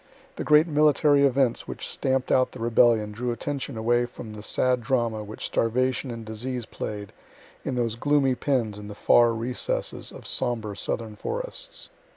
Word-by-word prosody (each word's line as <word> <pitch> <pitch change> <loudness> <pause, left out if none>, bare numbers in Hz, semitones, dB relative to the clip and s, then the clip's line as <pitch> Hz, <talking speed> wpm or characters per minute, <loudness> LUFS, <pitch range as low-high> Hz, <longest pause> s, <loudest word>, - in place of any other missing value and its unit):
The - - -3
great 150 +1 +6
military 150 -2 +4
events 135 -3 +2
which - - -5
stamp'd 130 -1 -1
out 130 0 +3
the 130 - -9
rebellion 115 -2 +3
drew 120 +3 -3
attention 135 0 -4
away 120 +2 +2
from 115 -2 -9
the 105 - -8
sad 125 +3 +1
drama 115 -3 0
which 105 +1 -6
starvation 130 +3 0
and 115 -2 -6
disease 120 +3 -4
play'd 105 -3 -6 0.5
in 130 - -2
those 115 -2 0
gloomy 140 +1 +2
pens 120 -6 -1
in 105 - -8
the 105 - -8
far 120 +2 +5
recesses 120 +3 -2
of - - -11
sombre 110 -4 -1
southern 110 +1 -3
forests." - - -5
120 Hz, 165 wpm, -26 LUFS, 110-130 Hz, 0.5 s, great